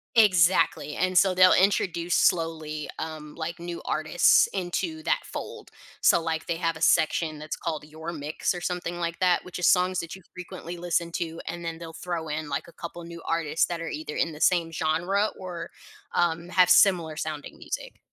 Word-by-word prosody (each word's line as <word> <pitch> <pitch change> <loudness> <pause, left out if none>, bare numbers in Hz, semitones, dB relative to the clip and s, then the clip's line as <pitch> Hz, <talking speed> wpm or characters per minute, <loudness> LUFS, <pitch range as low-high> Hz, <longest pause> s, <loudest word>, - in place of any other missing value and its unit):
Exactly. 185 -7 +4
And 185 +1 0
so 185 0 +5
they'll 185 0 +7
introduce 175 -3 +2
slowly, 160 -3 0
um, 155 -2 -6
like, 170 +1 -5
new 170 0 -6
artists 155 +2 +4
into 205 - -3
that - - +2
fold. - - -7 0.3
So, - - +5
like, 160 -1 -2
they 170 - 0
have 165 -1 -1
a 160 - -10
section 160 -1 +2
that's 155 +1 -5
called, 155 -3 -4
"Your 160 +2 -7
Mix" 155 +2 -2
or 175 - -5
something 175 -1 -3
like 170 -1 -3
that, 180 -1 +2
which 180 - -7
is 180 - +3
songs 185 0 +3
that 170 +1 -5
you 190 - -14
frequently 175 -1 -8
listen 170 0 -1
to, 165 -1 -3
and 170 0 -5
then 165 -1 -4
they'll 165 -1 -9
throw 165 -1 -4
in, 150 0 -3
like, 140 +3 -3
a 170 - -15
couple 170 0 -8
new 170 0 -9
artists 165 -1 +1
that 175 -1 -4
are 165 - -4
either 150 0 -5
in 165 - 0
the 150 0 -10
same 170 -3 +3
genre 175 +6 +1
or, 175 -3 -6 0.4
um, 170 0 0
have 180 -1 +4
similar 180 -4 +5
sounding 155 -1 -5
music. - - -6
170 Hz, 190 wpm, -26 LUFS, 160-180 Hz, 0.4 s, they'll